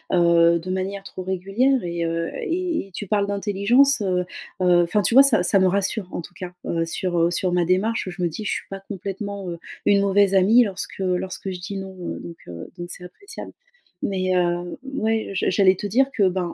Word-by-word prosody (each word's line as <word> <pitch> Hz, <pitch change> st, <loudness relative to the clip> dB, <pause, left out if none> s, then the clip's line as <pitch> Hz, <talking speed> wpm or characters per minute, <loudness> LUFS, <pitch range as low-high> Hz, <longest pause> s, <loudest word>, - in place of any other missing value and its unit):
heu, 170 Hz, -1 st, +5 dB
de 175 Hz, +3 st, -8 dB
manière 195 Hz, +1 st, -3 dB
trop 185 Hz, -, -8 dB
régulière 195 Hz, +9 st, +1 dB
et, 170 Hz, -1 st, -2 dB
heu, 165 Hz, 0 st, -2 dB
et 360 Hz, -, -2 dB
et -, -, -21 dB
tu 205 Hz, -, -5 dB
parles 200 Hz, +1 st, +1 dB
d'intelligence, 205 Hz, +7 st, +3 dB
heu 185 Hz, -3 st, 0 dB, 0.4 s
heu. 175 Hz, -1 st, +5 dB
Enfin, 175 Hz, +5 st, +1 dB
tu 200 Hz, -, +1 dB
vois? 270 Hz, +3 st, +9 dB
Ça 220 Hz, -10 st, +3 dB
ça 195 Hz, -, +3 dB
me 185 Hz, -, +4 dB
rassure 195 Hz, +1 st, 0 dB
en -, -, -3 dB
tout 170 Hz, -, -12 dB
cas, 180 Hz, 0 st, -8 dB
heu, 165 Hz, -1 st, -1 dB
sur, 175 Hz, +1 st, -2 dB
heu, 170 Hz, +1 st, +3 dB
sur 180 Hz, +1 st, 0 dB
ma 175 Hz, -1 st, +2 dB
démarche. 190 Hz, +5 st, +1 dB
Je 180 Hz, 0 st, -7 dB
me 175 Hz, -, +2 dB
dis, 210 Hz, +7 st, -6 dB
je -, -, -1 dB
suis -, -, -4 dB
pas 195 Hz, 0 st, -6 dB
complètement, 195 Hz, 0 st, -6 dB
heu, 170 Hz, -1 st, -6 dB, 0.3 s
une 200 Hz, -1 st, +5 dB
mauvaise 200 Hz, 0 st, +3 dB
amie 215 Hz, +6 st, +6 dB
lorsque 195 Hz, -2 st, -5 dB
lorsque 185 Hz, +1 st, -2 dB
je 180 Hz, -, -6 dB
dis: 185 Hz, +3 st, -6 dB
«Non», 190 Hz, 0 st, -7 dB
heu. 175 Hz, -, -5 dB
Donc, 170 Hz, -1 st, -9 dB
heu, 85 Hz, -1 st, -8 dB
donc 175 Hz, -, -6 dB
c'est 180 Hz, -, -8 dB
appréciable. 405 Hz, -, -10 dB, 0.5 s
Mais, 185 Hz, -2 st, 0 dB
heu, 175 Hz, 0 st, 0 dB, 0.2 s
ouais, 220 Hz, -4 st, -1 dB
je 190 Hz, -, 0 dB
j'allais 190 Hz, 0 st, +4 dB
te 205 Hz, -, -4 dB
dire 255 Hz, +7 st, +3 dB
que, 200 Hz, -4 st, +4 dB
ben, 180 Hz, -2 st, -3 dB
190 Hz, 220 wpm, -23 LUFS, 175-205 Hz, 0.5 s, vois